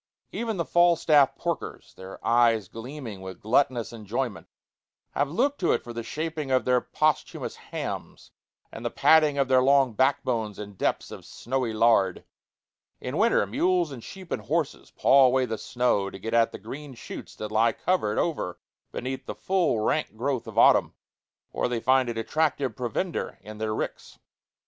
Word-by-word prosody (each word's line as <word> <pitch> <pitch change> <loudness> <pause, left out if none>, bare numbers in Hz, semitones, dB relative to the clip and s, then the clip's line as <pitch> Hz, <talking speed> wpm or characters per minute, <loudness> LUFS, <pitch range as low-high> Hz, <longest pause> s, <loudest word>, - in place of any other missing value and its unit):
Even 225 -3 -3
the 170 - -1
Falstaff 155 -5 +4
porkers, 170 -2 -4
their 95 +1 -10
eyes 115 -4 +3
gleaming 115 -3 -8
with 95 -1 -8
gluttonous 120 +1 +1
enjoyment, 115 0 -4 0.6
have 145 0 0
looked 270 - 0
to 175 - +2
it - - -1
for 120 - -8
the 115 - -4
shaping 155 +3 -4
of 130 -1 +2
their 125 -1 +3
posthumous 155 -1 -1
hams - - -7 0.4
and - - -9
the - - -1
padding 155 -3 +4
of 135 -1 +2
their 130 -1 +4
long 135 -2 +4
backbones 120 -4 0
in 105 -1 -8
depths 95 - -2
of - - -9
snowy 130 -2 -3
lard. 110 -4 +3 0.8
In - - -5
winter - - +3
mules 175 - +1
and 125 -4 -8
sheep 190 -3 -11
and - - -2
horses 160 -1 -2
paw 135 -1 +5
away 130 0 +2
the 110 -2 -4
snow 120 -6 0
to 95 - -9
get 115 +4 -5
at 115 -1 +4
the - - -7
green 135 +6 -9
shoots - - -9
that 105 -1 -6
lie 115 +2 +3
covered 110 - 0
over 145 - -1 0.3
beneath 130 +1 -5
the - - -5
full, 180 - +1
rank 150 +3 0
growth 130 0 -2
of - - -9
autumn, - - +5 0.6
or - - -1
they 120 -1 -2
find 130 +1 +3
it 115 - -4
attractive 140 +1 0
provender 130 - -3
in 110 0 -10
their 110 -1 -1
ricks. - - -5
130 Hz, 170 wpm, -26 LUFS, 110-150 Hz, 0.8 s, paw